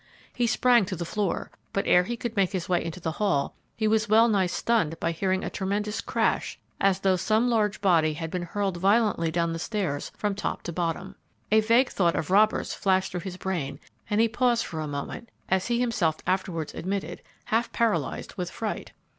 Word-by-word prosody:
He 240 Hz, -1 st, +1 dB
sprang 240 Hz, -1 st, +4 dB
to 185 Hz, 0 st, -4 dB
the 170 Hz, 0 st, -4 dB
floor, 205 Hz, +2 st, -2 dB, 0.2 s
but 195 Hz, -, 0 dB
ere 180 Hz, 0 st, +5 dB
he 240 Hz, +4 st, -3 dB
could 235 Hz, -1 st, -4 dB
make 195 Hz, -1 st, +2 dB
his 185 Hz, -3 st, -2 dB
way 180 Hz, -1 st, +1 dB
into 165 Hz, +2 st, -5 dB
the 165 Hz, -2 st, -2 dB
hall 180 Hz, -9 st, +1 dB, 0.2 s
he 220 Hz, -, 0 dB
was 215 Hz, 0 st, +2 dB
well 225 Hz, +2 st, +6 dB
nigh 200 Hz, -5 st, +2 dB
stunned 175 Hz, -4 st, 0 dB
by 165 Hz, -, 0 dB
hearing 185 Hz, +3 st, 0 dB
a -, -, -2 dB
tremendous 210 Hz, +2 st, -2 dB
crash, -, -, 0 dB, 0.2 s
as 195 Hz, -1 st, +2 dB
though 190 Hz, -1 st, +3 dB
some 220 Hz, +6 st, +2 dB
large 210 Hz, -2 st, +1 dB
body 165 Hz, -5 st, +3 dB
had 165 Hz, +1 st, -5 dB
been 180 Hz, -, -2 dB
hurled 190 Hz, +1 st, -2 dB
violently 200 Hz, -3 st, +2 dB
down 170 Hz, 0 st, 0 dB
the 165 Hz, -, -4 dB
stairs 175 Hz, -8 st, -2 dB
from 210 Hz, -1 st, 0 dB
top 200 Hz, +1 st, -3 dB
to 170 Hz, -, -5 dB
bottom. 175 Hz, +3 st, -2 dB, 0.4 s
A 220 Hz, -, +6 dB
vague 235 Hz, +4 st, +4 dB
thought 170 Hz, -3 st, +1 dB
of 160 Hz, -, -2 dB
robbers 215 Hz, +2 st, +3 dB
flashed 190 Hz, -1 st, +1 dB
through 180 Hz, -, -3 dB
his 185 Hz, 0 st, -6 dB
brain, 175 Hz, -8 st, -3 dB, 0.3 s
and 210 Hz, -, +1 dB
he 230 Hz, -, +5 dB
paused 235 Hz, +1 st, +1 dB
for 160 Hz, -, -5 dB
a 155 Hz, -, -3 dB
moment, 145 Hz, +11 st, -5 dB, 0.2 s
as 190 Hz, 0 st, +1 dB
he 240 Hz, 0 st, +1 dB
himself 200 Hz, -10 st, +1 dB
afterwards 180 Hz, -4 st, -1 dB
admitted, 195 Hz, +2 st, -4 dB, 0.2 s
half 230 Hz, +2 st, 0 dB
paralyzed 195 Hz, -, -1 dB
with 180 Hz, -2 st, -3 dB
fright. 220 Hz, +2 st, -5 dB
195 Hz, 205 wpm, -26 LUFS, 175-215 Hz, 0.4 s, well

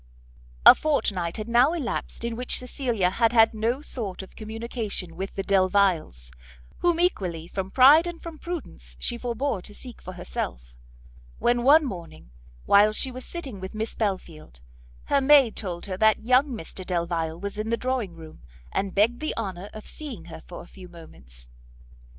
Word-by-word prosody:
A -, -, +13 dB
fortnight 195 Hz, -, -1 dB
had 215 Hz, 0 st, -5 dB
now 245 Hz, +6 st, +4 dB
elapsed 280 Hz, -7 st, -4 dB
in 235 Hz, -1 st, -2 dB
which 250 Hz, +2 st, -2 dB
Cecilia 240 Hz, -7 st, -1 dB
had 230 Hz, +3 st, +2 dB
had 225 Hz, -1 st, +6 dB
no 230 Hz, +5 st, -1 dB
sort 205 Hz, -10 st, -4 dB
of 190 Hz, -, -15 dB
communication 220 Hz, -5 st, -4 dB
with 190 Hz, +3 st, -5 dB
the 195 Hz, -, -2 dB
Delviles, 185 Hz, -, +1 dB, 0.5 s
whom 345 Hz, -1 st, +2 dB
equally 180 Hz, -, 0 dB
from 190 Hz, +1 st, -4 dB
pride 285 Hz, -, +7 dB
and 345 Hz, -1 st, -6 dB
from 330 Hz, -2 st, -9 dB
prudence 345 Hz, -2 st, -7 dB
she 240 Hz, -, -2 dB
forbore 235 Hz, -2 st, -2 dB
to 205 Hz, +3 st, -7 dB
seek 245 Hz, 0 st, -8 dB
for 185 Hz, -, -8 dB
herself, -, -, -5 dB, 0.6 s
when 240 Hz, 0 st, +2 dB
one 295 Hz, +5 st, +6 dB
morning, 170 Hz, -, -8 dB, 0.3 s
while 205 Hz, +1 st, +6 dB
she 260 Hz, +4 st, -2 dB
was 255 Hz, +1 st, -8 dB
sitting 275 Hz, -, -7 dB
with 190 Hz, +3 st, -7 dB
Miss 220 Hz, +1 st, -3 dB
Belfield, 170 Hz, -, -4 dB, 0.4 s
her 280 Hz, -, +2 dB
maid 270 Hz, -4 st, +6 dB
told 175 Hz, -4 st, -4 dB
her 190 Hz, -2 st, -4 dB
that 220 Hz, +1 st, +3 dB
young 255 Hz, +4 st, +4 dB
Mr 195 Hz, -, -6 dB
Delvile 170 Hz, -2 st, -2 dB
was 200 Hz, +2 st, -5 dB
in 215 Hz, +1 st, -2 dB
the 230 Hz, -, +1 dB
drawing 250 Hz, -9 st, -2 dB
room, 160 Hz, -1 st, -12 dB, 0.3 s
and 195 Hz, -1 st, -2 dB
begged 225 Hz, +4 st, +3 dB
the 310 Hz, -, -3 dB
honour 195 Hz, -3 st, -4 dB
of 215 Hz, -, -10 dB
seeing 255 Hz, -, -7 dB
her 160 Hz, -1 st, -10 dB
for 175 Hz, -, -9 dB
a -, -, -16 dB
few 185 Hz, -2 st, -13 dB
moments. 60 Hz, -, -12 dB
215 Hz, 175 wpm, -25 LUFS, 180-250 Hz, 0.6 s, A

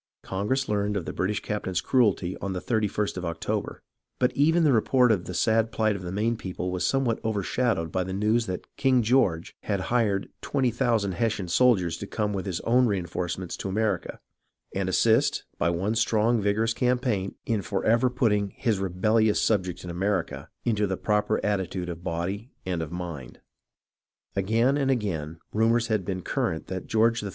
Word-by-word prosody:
Congress 120 Hz, +8 st, -1 dB
learned 105 Hz, 0 st, 0 dB
of 90 Hz, -, -4 dB
the -, -, -4 dB
British 105 Hz, +2 st, -1 dB
captain's 95 Hz, -4 st, -2 dB
cruelty, 100 Hz, -6 st, +2 dB
on 100 Hz, -1 st, -3 dB
the 90 Hz, -, -2 dB
31st 105 Hz, -2 st, -1 dB
of 90 Hz, -, -3 dB
October, 85 Hz, 0 st, -3 dB, 0.3 s
but 125 Hz, -, +1 dB
even 165 Hz, +4 st, +4 dB
the 145 Hz, -4 st, +4 dB
report 125 Hz, +2 st, +4 dB
of 95 Hz, -5 st, 0 dB
the 90 Hz, -, -6 dB
sad 110 Hz, +4 st, +2 dB
phght 110 Hz, -1 st, +1 dB
of 100 Hz, -, -6 dB
the 90 Hz, -1 st, -5 dB
Maine 110 Hz, +4 st, 0 dB
people 90 Hz, -3 st, -4 dB
was 90 Hz, -1 st, -2 dB
somewhat 135 Hz, -4 st, +1 dB
overshadowed 105 Hz, -4 st, 0 dB
by 95 Hz, -, 0 dB
the 95 Hz, -, -5 dB
news 105 Hz, +4 st, +1 dB
that 90 Hz, -1 st, -4 dB
King 130 Hz, -3 st, +3 dB
George 105 Hz, -9 st, +2 dB
had 100 Hz, -2 st, -1 dB
"hired" 105 Hz, -5 st, +1 dB
twenty 130 Hz, -4 st, 0 dB
thousand 115 Hz, -5 st, +1 dB
Hessian 110 Hz, -2 st, -1 dB
soldiers 90 Hz, -4 st, +3 dB
to 100 Hz, -, -7 dB
come 105 Hz, -1 st, -1 dB
with 95 Hz, 0 st, -3 dB
his 90 Hz, -3 st, -2 dB
own 125 Hz, +2 st, +3 dB
reenforcements 90 Hz, -2 st, -3 dB
to 95 Hz, -, -4 dB
America, 100 Hz, -2 st, -1 dB, 0.5 s
and 95 Hz, -1 st, -1 dB
assist, 110 Hz, +4 st, +3 dB, 0.2 s
by 85 Hz, -, +2 dB
one 90 Hz, +5 st, 0 dB
strong 115 Hz, 0 st, +2 dB
vigorous 110 Hz, +3 st, +1 dB
campaign, 125 Hz, -6 st, 0 dB
in 110 Hz, -3 st, 0 dB
forever 115 Hz, +6 st, +2 dB
put 125 Hz, -2 st, +1 dB
ting 100 Hz, -1 st, 0 dB
his 110 Hz, -6 st, 0 dB
rebellious 105 Hz, +4 st, +2 dB
subjects 95 Hz, -5 st, 0 dB
in 90 Hz, -, -5 dB
America 95 Hz, +3 st, -2 dB
" -, -, -52 dB
into 105 Hz, -3 st, +1 dB
the 95 Hz, -1 st, -2 dB
proper 105 Hz, -1 st, +1 dB
attitude 95 Hz, -3 st, -1 dB
of 85 Hz, 0 st, -7 dB
body 95 Hz, +8 st, -3 dB, 0.2 s
and 90 Hz, -3 st, -1 dB
of 80 Hz, -1 st, -5 dB
mind. 85 Hz, -8 st, -6 dB, 1.0 s
Again 115 Hz, +8 st, +2 dB
and 135 Hz, -2 st, +1 dB
again 85 Hz, -, -1 dB, 0.2 s
rumours 115 Hz, +2 st, +2 dB
had 110 Hz, -3 st, +1 dB
been 95 Hz, -2 st, -3 dB
current 80 Hz, -, -1 dB
that 95 Hz, -1 st, -5 dB
George 115 Hz, +1 st, +2 dB
III. 100 Hz, -, -4 dB
105 Hz, 180 wpm, -26 LUFS, 95-115 Hz, 1.0 s, even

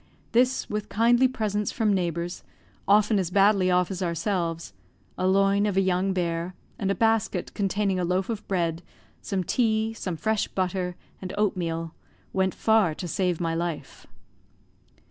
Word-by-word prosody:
This, 255 Hz, +2 st, +2 dB
with 210 Hz, 0 st, -4 dB
kindly 240 Hz, +4 st, +4 dB
presents 210 Hz, -4 st, -2 dB
from 220 Hz, -3 st, +1 dB
neighbours 175 Hz, -2 st, -2 dB, 0.4 s
often 210 Hz, +1 st, +4 dB
as 180 Hz, -3 st, -1 dB
badly 195 Hz, 0 st, +4 dB
off 180 Hz, +1 st, +2 dB
as 190 Hz, 0 st, -4 dB
ourselves 170 Hz, -, -2 dB, 0.4 s
a 185 Hz, -, 0 dB
loin 195 Hz, +2 st, +3 dB
of 195 Hz, -2 st, -1 dB
a -, -, +5 dB
young 190 Hz, +1 st, +1 dB
bear, 175 Hz, -1 st, -2 dB, 0.2 s
and 195 Hz, -, -1 dB
a 195 Hz, -, +1 dB
basket, 225 Hz, -5 st, 0 dB
containing 195 Hz, -1 st, 0 dB
a -, -, 0 dB
loaf 180 Hz, +2 st, 0 dB
of 225 Hz, -3 st, -5 dB
bread, 170 Hz, -3 st, -1 dB, 0.4 s
some 190 Hz, -2 st, -2 dB
tea, 220 Hz, +1 st, +1 dB
some 185 Hz, -6 st, -4 dB
fresh 220 Hz, +4 st, 0 dB
butter, 180 Hz, -1 st, -2 dB, 0.3 s
and 185 Hz, 0 st, -6 dB
oatmeal, 165 Hz, -5 st, -1 dB, 0.4 s
went 190 Hz, -1 st, +1 dB
far 220 Hz, -8 st, +3 dB
to 180 Hz, -, -5 dB
save 180 Hz, +1 st, 0 dB
my 165 Hz, -2 st, -1 dB
life. 170 Hz, -1 st, -4 dB
190 Hz, 155 wpm, -26 LUFS, 175-210 Hz, 0.4 s, a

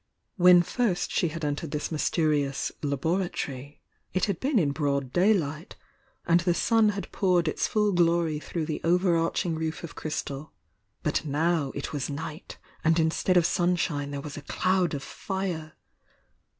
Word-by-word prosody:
When 180 Hz, -2 st, +7 dB
first 210 Hz, -1 st, -1 dB
she 175 Hz, -, +1 dB
had 160 Hz, 0 st, -4 dB
en 145 Hz, -1 st, -1 dB
tered 165 Hz, -, -5 dB
this 150 Hz, +2 st, -3 dB
mysterious 150 Hz, -3 st, 0 dB
"laboratory" 145 Hz, -2 st, -2 dB, 0.3 s
it 185 Hz, -, +3 dB
had 200 Hz, -5 st, -2 dB
been 275 Hz, -1 st, +1 dB
in 150 Hz, -8 st, +3 dB
broad 140 Hz, -3 st, -1 dB
daylight, 175 Hz, -4 st, +1 dB, 0.5 s
and 170 Hz, 0 st, +4 dB
the 175 Hz, -1 st, +1 dB
sun 225 Hz, +1 st, +3 dB
had 195 Hz, -, -6 dB
poured 180 Hz, -3 st, +2 dB
its 155 Hz, -, 0 dB
full 210 Hz, -1 st, +2 dB
glory 170 Hz, -3 st, +2 dB
through 160 Hz, +1 st, -4 dB
the 155 Hz, -1 st, -4 dB
over 180 Hz, +1 st, +3 dB
arching 165 Hz, +1 st, 0 dB
roof 160 Hz, +1 st, -3 dB
of 170 Hz, -, -7 dB
crystal, 150 Hz, -1 st, -5 dB, 0.2 s
— -, -, -46 dB
but -, -, 0 dB
now 155 Hz, 0 st, 0 dB
it 140 Hz, -, -5 dB
was 145 Hz, -2 st, -2 dB
night 155 Hz, +3 st, -6 dB, 0.3 s
and 165 Hz, +1 st, +3 dB
instead 165 Hz, +3 st, +2 dB
of 175 Hz, -, +4 dB
sunshine 175 Hz, -5 st, 0 dB
there 140 Hz, -1 st, -4 dB
was 145 Hz, 0 st, -7 dB
a -, -, -6 dB
cloud 185 Hz, +2 st, 0 dB
of 135 Hz, -, -5 dB
fire! 180 Hz, -5 st, -4 dB
165 Hz, 165 wpm, -27 LUFS, 150-180 Hz, 0.5 s, When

